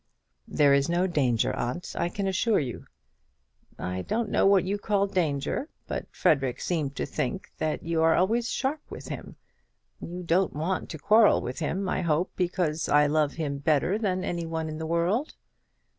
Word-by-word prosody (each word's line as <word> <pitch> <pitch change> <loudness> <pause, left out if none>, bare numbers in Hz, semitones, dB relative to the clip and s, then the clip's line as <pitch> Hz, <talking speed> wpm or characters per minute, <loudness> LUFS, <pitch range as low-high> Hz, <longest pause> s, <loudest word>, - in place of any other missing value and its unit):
"There 145 -2 +4
is 140 +2 +2
no 175 +2 +2
danger, 135 -10 +1
aunt, 140 +9 -4
I 170 - 0
can 200 +2 -3
assure 205 +3 +2
you." 125 -6 -3 0.9
"I 90 0 -3
don't 220 - -2
know - - +4
what 195 -2 +5
you 200 +2 -2
call 200 -1 +1
danger; 175 - -1 0.2
but - - -4
Frederic 135 -4 +1
seemed 150 -6 -2
to - - -2
think 185 +9 -3
that 155 -1 -1
you 165 -1 0
are 160 0 +5
always 230 +6 +1
sharp 275 +3 -1
with - - -9
him. - - -7 0.6
You 180 +2 -6
don't 180 +2 +2
want 170 +5 -2
to 160 - -6
quarrel 215 +7 +5
with 125 - -5
him, 185 +4 -2
I 185 - 0
hope, 170 +1 0
because 175 -4 -1
I 150 0 +5
love 150 -1 +1
him 145 -4 -3
better 155 +7 +1
than 185 -4 -1
any 170 -2 -3
one 160 -1 -3
in 155 0 -6
the 160 - -4
world?" 175 - 0
170 Hz, 180 wpm, -27 LUFS, 150-190 Hz, 0.9 s, what